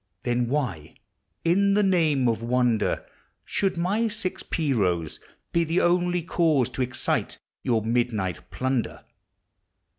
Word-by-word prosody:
Then 120 Hz, 0 st, 0 dB
why 120 Hz, -, -2 dB, 0.5 s
in 200 Hz, +4 st, +3 dB
the 210 Hz, -, +3 dB
name 160 Hz, -9 st, +3 dB
of 115 Hz, -1 st, 0 dB
wonder 120 Hz, -2 st, +1 dB, 0.4 s
Should 190 Hz, -3 st, -1 dB
my 200 Hz, +7 st, +1 dB
six 215 Hz, -4 st, -3 dB
pea 155 Hz, -4 st, -1 dB
r<»ws 90 Hz, -, 0 dB, 0.3 s
be 170 Hz, -, +3 dB
the 165 Hz, +2 st, -1 dB
<ml.\ 175 Hz, -1 st, +2 dB
cause 155 Hz, -8 st, +2 dB
To -, -, -4 dB
excite 130 Hz, 0 st, -1 dB, 0.2 s
your 115 Hz, -5 st, +1 dB
midnight 110 Hz, -6 st, -1 dB
plunder? 130 Hz, -2 st, -2 dB
135 Hz, 125 wpm, -25 LUFS, 115-175 Hz, 0.5 s, in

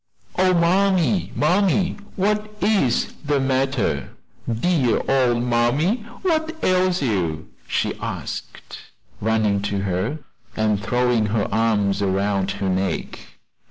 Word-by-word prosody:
"Oh, 185 Hz, 0 st, +3 dB
mammy, 185 Hz, +1 st, +2 dB
mammy! 185 Hz, +3 st, +2 dB, 0.2 s
what 210 Hz, +2 st, 0 dB
is 195 Hz, -, +1 dB
the 145 Hz, -1 st, +1 dB
matter? 135 Hz, -2 st, 0 dB, 0.4 s
dear 130 Hz, +1 st, +1 dB
old 125 Hz, -3 st, +2 dB
mammy, 125 Hz, -, +2 dB, 0.3 s
what 320 Hz, -3 st, 0 dB
ails 185 Hz, -2 st, +2 dB
you?" 85 Hz, -, -1 dB, 0.2 s
she -, -, 0 dB
asked, -, -, -6 dB, 0.4 s
running 110 Hz, -2 st, +1 dB
to 100 Hz, -1 st, -2 dB
her, 95 Hz, -, -1 dB, 0.4 s
and 105 Hz, -2 st, +1 dB
throwing 120 Hz, +1 st, +1 dB
her 105 Hz, -1 st, 0 dB
arms 105 Hz, -2 st, +1 dB
around 100 Hz, 0 st, 0 dB
her 95 Hz, -, -3 dB
neck. 95 Hz, +1 st, -2 dB
125 Hz, 110 wpm, -22 LUFS, -, 0.4 s, Oh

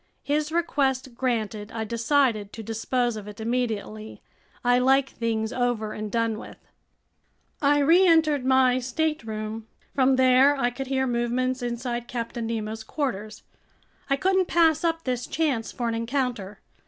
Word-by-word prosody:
His 300 Hz, +1 st, 0 dB
request 270 Hz, -6 st, 0 dB
granted, 225 Hz, -4 st, -2 dB
I 225 Hz, -1 st, -3 dB
decided 230 Hz, -2 st, +1 dB
to 225 Hz, -, -7 dB
dispose 230 Hz, +2 st, -1 dB
of 210 Hz, -1 st, -8 dB
it 210 Hz, 0 st, -10 dB
immediately. 220 Hz, -2 st, -3 dB, 0.4 s
I 245 Hz, 0 st, +4 dB
like 270 Hz, +1 st, +3 dB
things 220 Hz, -1 st, -2 dB
over 245 Hz, -4 st, -1 dB
and 210 Hz, -1 st, -5 dB
done 230 Hz, -1 st, 0 dB
with. -, -, -11 dB, 1.0 s
I 290 Hz, 0 st, +4 dB
reentered 320 Hz, -2 st, +4 dB
my 260 Hz, -1 st, +4 dB
stateroom. 225 Hz, -6 st, -3 dB, 0.3 s
From 265 Hz, -1 st, +3 dB
there 260 Hz, +2 st, +5 dB
I 245 Hz, -3 st, 0 dB
could 265 Hz, +2 st, -6 dB
hear 265 Hz, 0 st, 0 dB
movements 250 Hz, +1 st, -1 dB
inside 240 Hz, 0 st, -3 dB
Captain 235 Hz, -1 st, -4 dB
Nemo's 220 Hz, -1 st, -4 dB
quarters. 220 Hz, -5 st, -4 dB, 0.7 s
I 275 Hz, -, +4 dB
couldn't 375 Hz, +4 st, +2 dB
pass 320 Hz, -2 st, +3 dB
up 330 Hz, -1 st, 0 dB
this 250 Hz, -2 st, -2 dB
chance 280 Hz, -9 st, -1 dB
for 240 Hz, -, -3 dB
an 230 Hz, -, -1 dB
encounter. 230 Hz, -4 st, -2 dB
245 Hz, 140 wpm, -25 LUFS, 225-275 Hz, 1.0 s, there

